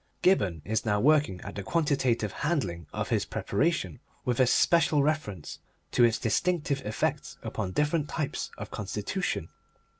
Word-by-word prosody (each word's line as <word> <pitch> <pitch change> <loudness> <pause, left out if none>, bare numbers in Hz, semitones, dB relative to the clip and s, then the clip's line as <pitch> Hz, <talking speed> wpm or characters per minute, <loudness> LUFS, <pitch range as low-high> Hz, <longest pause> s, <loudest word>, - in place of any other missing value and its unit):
Gibberne 95 - +3
is 110 +1 0
now 105 -2 +1
working 145 -7 +3
at 100 - -7
the 100 - -4
quantitative 130 - +1
handling 95 - -2
of - - -3
his - - +2
preparation, 135 - -1 0.3
with 125 -1 0
especial 150 +4 +4
reference 140 - -2 0.3
to 125 - +4
its 115 0 +4
distinctive 145 +3 0
effects 110 - -2
upon 95 -4 -3
different 150 - +1
types 150 -3 -2
of - - -7
constitution. - - -3
130 Hz, 140 wpm, -28 LUFS, 105-155 Hz, 0.3 s, especial